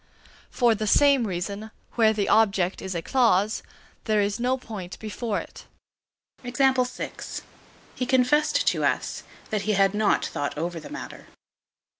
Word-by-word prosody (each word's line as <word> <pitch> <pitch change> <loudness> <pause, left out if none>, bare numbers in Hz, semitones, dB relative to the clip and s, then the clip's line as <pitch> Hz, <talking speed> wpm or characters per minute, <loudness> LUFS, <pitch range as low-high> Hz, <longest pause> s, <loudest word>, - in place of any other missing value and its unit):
For 240 -2 +3
the 215 0 -3
same 275 0 +4
reason, 200 +4 -4 0.2
where 225 -2 +4
the 210 -2 -1
object 195 -4 +2
is 190 -1 -5
a 165 - -3
clause, 220 -5 +2 0.4
there 215 -2 +2
is 205 +2 0
no 250 +2 +1
point 205 -8 -8
before 215 0 -3
it. - - -11 0.8
He 245 - -6
confessed 255 -1 -1 1.2
to - - -2
us - - -1 0.3
that 215 -2 0
he 215 +2 0
had 195 0 +3
not 210 -1 +2
thought 145 0 -3
over 170 +2 -3
the 155 - -10
matter. - - -8
215 Hz, 140 wpm, -25 LUFS, 195-235 Hz, 1.2 s, same